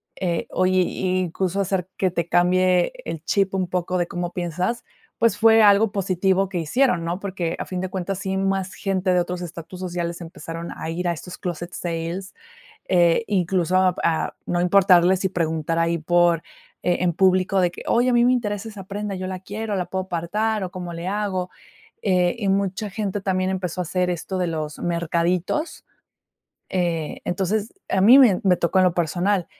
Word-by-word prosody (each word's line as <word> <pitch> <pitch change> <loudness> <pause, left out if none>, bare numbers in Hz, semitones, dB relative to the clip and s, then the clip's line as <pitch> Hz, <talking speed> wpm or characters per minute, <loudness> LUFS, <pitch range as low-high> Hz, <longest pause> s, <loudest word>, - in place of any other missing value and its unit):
eh, 175 -3 -2
hoy, 185 0 +2
i 185 +1 -1
incluso 185 +2 -2
hacer 190 -1 -1
que 185 -2 +1
te 170 -2 -2
cambie 180 +1 +3
el 160 -1 -5
chip 195 0 +1
un 185 -1 0
poco 180 0 -1
de 175 -1 0
cómo 175 0 -4
piensas, 180 +7 -2 0.3
pues, 230 -3 +2
fue 225 +1 +6
algo 205 +1 +5
positivo 190 -1 +1
que 190 - -4
hicieron, 180 - +1
¿no? 170 +2 -2
Porque, 180 -4 -3
a - - -3
fin 185 -1 -4
de 185 - -3
cuentas, 190 0 -3
sí, 190 -1 -2
más 195 -1 -1
gente 190 -1 0
de 180 - +3
otros 180 +1 -3
estatus 175 +1 -8
sociales 175 -2 -4
empezaron 165 0 -7
a 160 - -5
ir 175 +2 -2
a 175 - +1
estos 180 +2 -9
clóset 175 0 -5
sales, 170 +3 -4 0.6
eh, 175 +2 +4
incluso 185 -2 +1
a 185 -1 +3
p - - -5
a 165 -1 0
no 175 - -1
importarle 180 -1 +5
si 190 +1 -1
preguntar 165 -2 -1
ahí 170 0 +1
por 175 +1 +3 0.4
eh, 180 - +2
en 175 -1 +1
público 185 +1 +3
de 175 -1 +2
que: - - -10
"Oye, 245 +2 +3
a - - +2
mí 240 0 +4
me 250 - +4
interesa 210 -3 -2
esa 205 -3 -9
prenda, 200 +1 -4
yo 185 0 -5
la 185 -1 -5
quiero, 210 +3 -4
¿la 180 - -1
puedo 190 +1 -3
apartar 200 +5 -1
o 180 - -5
cómo 180 -1 -6
le 170 +2 -5
hago?" 190 -2 -2 0.5
Eh, 180 -2 +2
y 205 -4 -1
mucha 195 +2 0
gente 200 0 -3
también 185 -1 0
empezó 185 -2 -3
a - - -1
hacer 180 +1 -1
esto 180 +2 -3
de 180 -1 0
los 155 -2 -4
mercaditos, 175 - -1 0.9
eh, 170 -4 -1
entonces, 200 +4 -1 0.2
a 190 - +2
mí 235 +8 +8
me 230 -9 +6
me 185 -2 +4
tocó 170 +2 +1
en 185 - +5
lo 175 - +1
personal, 175 +3 0
185 Hz, 195 wpm, -23 LUFS, 175-195 Hz, 0.9 s, mí